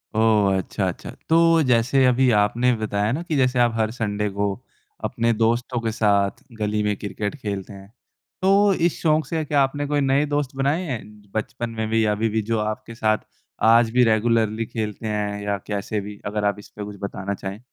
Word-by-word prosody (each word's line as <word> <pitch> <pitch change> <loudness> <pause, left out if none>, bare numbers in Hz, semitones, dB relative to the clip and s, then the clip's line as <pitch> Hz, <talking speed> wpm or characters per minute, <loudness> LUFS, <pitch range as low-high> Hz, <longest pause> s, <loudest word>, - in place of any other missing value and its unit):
ओह! 105 -3 +3
अच्छा, 95 - -2
अच्छा। - - -5 0.2
तो 165 0 +5
जैसे 130 +2 +3
अभी 125 +1 +4
आपने 120 +4 +2
बताया 105 0 -1
ना 160 +6 -2
कि 160 -3 -2
जैसे 125 -1 +2
आप 120 -1 +4
हर 110 -1 0
संडे 105 -3 -2
को 100 0 -1 0.5
अपने 115 0 0
दोस्तों 120 +2 0
के 115 -1 -1
साथ 100 +1 +1 0.2
गली 105 0 0
में 105 -1 0
क्रिकेट 105 +3 -4
खेलते 100 -1 -4
हैं। 100 +1 -13 0.5
तो 195 +1 +4
इस 170 -1 0
शौक़ 155 -1 +2
से 160 -1 -1
क्या 145 -1 +2
आपने 145 +2 -2
कोई 145 -1 +1
नए 135 +2 +2
दोस्त 145 -2 -2
बनाए 140 +6 +1
हैं 125 -7 -3 0.3
बचपन 115 +2 -3
में 110 0 -1
भी 110 0 +2
या 105 - +2
अभी 110 +2 0
भी 110 +1 0
जो 110 +1 -1
आपके 110 +2 -4
साथ 110 -1 +2 0.5
आज 115 0 +5
भी 125 0 +4
रेगुलर्ली 110 0 +2
खेलते 110 -1 -4
हैं 105 -1 -2
या 100 -1 -1
कैसे 105 +1 -2
भी? 105 0 -9
अगर 105 0 -2
आप 100 0 0
इस - - -13
पर 105 - -8
कुछ 105 -1 -9
बताना 100 0 -4
चाहें। 95 +1 -6
110 Hz, 200 wpm, -23 LUFS, 105-130 Hz, 0.5 s, तो